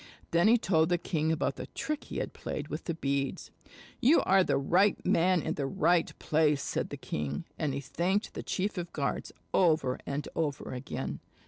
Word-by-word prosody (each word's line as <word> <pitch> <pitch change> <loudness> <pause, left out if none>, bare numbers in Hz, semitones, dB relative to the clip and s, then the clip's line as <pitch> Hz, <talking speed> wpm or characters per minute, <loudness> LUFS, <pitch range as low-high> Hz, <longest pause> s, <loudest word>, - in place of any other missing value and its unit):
Then 170 +4 +4
he 235 +2 +7
told 160 -7 +2
the 175 - +3
king 160 -2 -1
about 160 - 0
the - - -6
trick 305 -2 -4
he - - -6
had - - -3
played 150 0 -5
with 155 +3 -5
the 170 - -2
beads. 140 -3 -2 0.5
"You 270 +7 +5
are 190 0 +4
the - - +1
right 180 +8 +3
man 180 0 +3
in - - -1
the 140 -2 -2
right 165 +5 +2
place," 150 -2 +2
said - - -2
the - - -6
king, 75 -1 -4
and 150 -3 0
he 140 - -3
thanked 185 - -1
the - - -5
chief 200 0 -2
of 175 - -3
the - - -36
guards 140 -2 -2 0.2
over 155 -8 +3
and 140 +1 -3
over 150 -5 -2
again. 125 +1 -4
160 Hz, 200 wpm, -30 LUFS, 140-185 Hz, 0.5 s, he